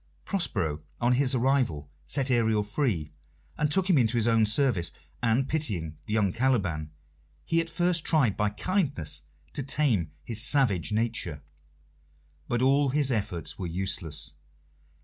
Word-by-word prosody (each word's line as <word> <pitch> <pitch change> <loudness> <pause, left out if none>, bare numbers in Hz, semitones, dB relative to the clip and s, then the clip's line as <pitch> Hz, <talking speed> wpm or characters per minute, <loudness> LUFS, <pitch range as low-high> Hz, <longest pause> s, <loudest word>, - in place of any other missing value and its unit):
Prospero, 90 - -1 0.2
on 120 +1 +2
his 130 0 +2
arrival, 125 - +1 0.2
set 135 - +1
Ariel 110 -3 +2
free, 100 - -2 0.4
and 150 0 0
took 185 +4 +2
him 175 -7 +4
into 120 0 +2
his 115 0 +2
own 115 -2 +3
service, 110 - +2 0.3
and, 120 +3 +1
pitying 95 - -1
the 105 - -3
young 100 -4 +1
Caliban, 100 -12 0 0.6
he 165 0 +2
at 165 - -6
first 175 -1 +1
tried 135 - +2
by 105 0 +1
kindness 140 - -2 0.3
to 145 - -3
tame 130 - +1
his 110 -2 0
savage 115 - +3
nature. 105 -9 -2 1.0
But 120 +1 0
all 140 +1 +3
his 140 0 +2
efforts 100 -7 -3
were 90 - -3
useless. 85 -3 -2
115 Hz, 145 wpm, -27 LUFS, 95-140 Hz, 1.0 s, him